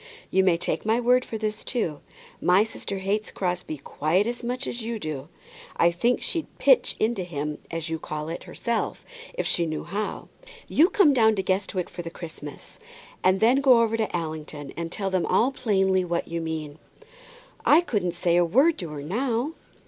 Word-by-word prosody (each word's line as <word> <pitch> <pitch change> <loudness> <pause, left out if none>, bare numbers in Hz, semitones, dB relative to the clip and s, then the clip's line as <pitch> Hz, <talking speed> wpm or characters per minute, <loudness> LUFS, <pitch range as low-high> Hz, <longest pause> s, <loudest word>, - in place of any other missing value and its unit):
You 190 - +4
may 180 -3 +4
take 175 - -2
my 225 +2 +2
word 250 +1 +4
for 225 - -5
this, 215 0 -3
too, 170 - -2 0.4
my 185 +3 +5
sister 215 -3 -5
hates 200 +3 -1
Crosbie 180 -4 -3
quite 155 +7 0
as 240 +1 -4
much 250 +3 -3
as 240 - -4
you 230 +1 -3
do. 155 -8 -5 0.5
I 170 - +5
think 235 +8 +1
she'd 330 -3 -2
'pitch - - +4
into 220 -2 +1
him,' 150 -3 -4
as 165 0 -4
you 160 0 -3
call 150 0 -5
it, 165 +1 -6
herself, 235 -1 -3 0.3
if - - -2
she 170 -1 +1
knew 155 -1 -3
how. 205 +4 -4 0.4
You 330 +5 +4
come 350 -10 +5
down 220 -4 +4
to 190 - -1
Guestwick 185 -1 -1
for - - -7
the 170 - -6
Christmas, 160 -4 -9 0.4
and 185 +1 +4
then 240 +4 +5
go 255 -4 +6
over 225 0 0
to 220 -1 -1
Allington 155 -3 -5
and 165 0 -4
tell 195 -1 -2
them 185 -2 +1
all 250 +4 +3
plainly 190 -7 +2
what 170 -1 -2
you 170 0 -3
mean." 160 -2 -5 0.8
"I 310 +4 +6
couldn't 195 - -1
say 175 0 +2
a 175 - +5
word 270 - +3
to 175 -5 -5
her 145 -2 -6
now." 240 - -1
190 Hz, 190 wpm, -25 LUFS, 165-230 Hz, 0.8 s, go